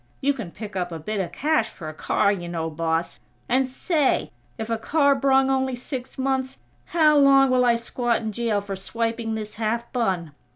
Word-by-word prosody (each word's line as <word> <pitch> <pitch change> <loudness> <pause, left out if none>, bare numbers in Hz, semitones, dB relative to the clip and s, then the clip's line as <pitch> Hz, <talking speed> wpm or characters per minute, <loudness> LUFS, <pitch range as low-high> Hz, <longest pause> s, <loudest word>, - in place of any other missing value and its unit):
You 285 +1 +2
can 230 -10 -6
pick 210 +3 -9
up 180 -1 -2
a 165 - -4
bit 205 +7 -4
of 175 -3 -2
cash 310 - +1
for 155 - -9
a 155 - -5
car, 200 - +1
you 175 -4 -4
know, 165 -1 -3
boss. 165 +1 -2 0.3
And 260 +1 +2
say, 295 +2 0 0.3
if 220 - -4
a 230 -1 -1
car 285 +2 +3
brung 270 0 +3
only 265 -1 0
six 250 +1 -7
months, 265 0 -1 0.3
how 310 -3 +4
long 275 -1 +6
will 250 -1 +4
I 240 -1 +4
squat 235 0 -1
in 220 -1 -3
jail 220 -2 0
for 200 -1 -5
swiping 225 +3 -2
this 215 -1 -6
half 230 +1 -2
bun? 185 - -1
235 Hz, 200 wpm, -24 LUFS, 195-265 Hz, 0.3 s, long